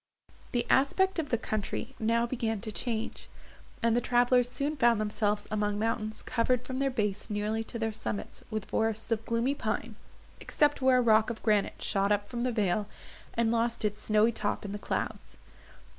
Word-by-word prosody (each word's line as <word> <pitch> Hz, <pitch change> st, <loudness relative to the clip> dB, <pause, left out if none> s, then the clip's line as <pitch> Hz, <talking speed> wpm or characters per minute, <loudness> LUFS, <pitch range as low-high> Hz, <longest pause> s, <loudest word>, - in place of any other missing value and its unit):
The 240 Hz, -2 st, 0 dB
aspect 375 Hz, +7 st, +3 dB
of 310 Hz, -, -2 dB
the 235 Hz, -, +2 dB
country 215 Hz, +3 st, -3 dB
now 230 Hz, +1 st, +2 dB
began 230 Hz, -3 st, -2 dB
to 220 Hz, 0 st, -4 dB
change, 225 Hz, 0 st, -3 dB, 0.5 s
and 230 Hz, 0 st, +3 dB
the 240 Hz, -, +2 dB
travellers 245 Hz, 0 st, +3 dB
soon 285 Hz, +4 st, -1 dB
found 240 Hz, -5 st, +4 dB
themselves 210 Hz, -1 st, 0 dB
among 210 Hz, -1 st, 0 dB
mountains 215 Hz, 0 st, -1 dB
covered 250 Hz, +1 st, 0 dB
from 260 Hz, 0 st, -4 dB
their 275 Hz, 0 st, +2 dB
base 210 Hz, -5 st, -2 dB
nearly 210 Hz, +2 st, -1 dB
to 235 Hz, -, -5 dB
their 225 Hz, -1 st, -1 dB
summits 110 Hz, -, -4 dB
with 215 Hz, -3 st, -3 dB
forests 220 Hz, +1 st, -1 dB
of 225 Hz, -1 st, +1 dB
gloomy 235 Hz, +4 st, +1 dB
pine, 225 Hz, -3 st, -3 dB, 0.4 s
except 290 Hz, -2 st, +1 dB
where 260 Hz, -1 st, +5 dB
a -, -, +4 dB
rock 220 Hz, -1 st, +4 dB
of 235 Hz, -, -6 dB
granite 210 Hz, -3 st, +1 dB
shot 200 Hz, 0 st, +1 dB
up 205 Hz, 0 st, +1 dB
from 240 Hz, -1 st, -4 dB
the 250 Hz, 0 st, +1 dB
vale, 205 Hz, -2 st, 0 dB, 0.5 s
and 230 Hz, -1 st, +2 dB
lost 235 Hz, -1 st, 0 dB
its 210 Hz, 0 st, -2 dB
snowy 215 Hz, +2 st, +3 dB
top 220 Hz, -, -2 dB
in 200 Hz, -, -4 dB
the 205 Hz, -, -5 dB
clouds. 70 Hz, -, -4 dB
225 Hz, 185 wpm, -30 LUFS, 210-245 Hz, 0.5 s, where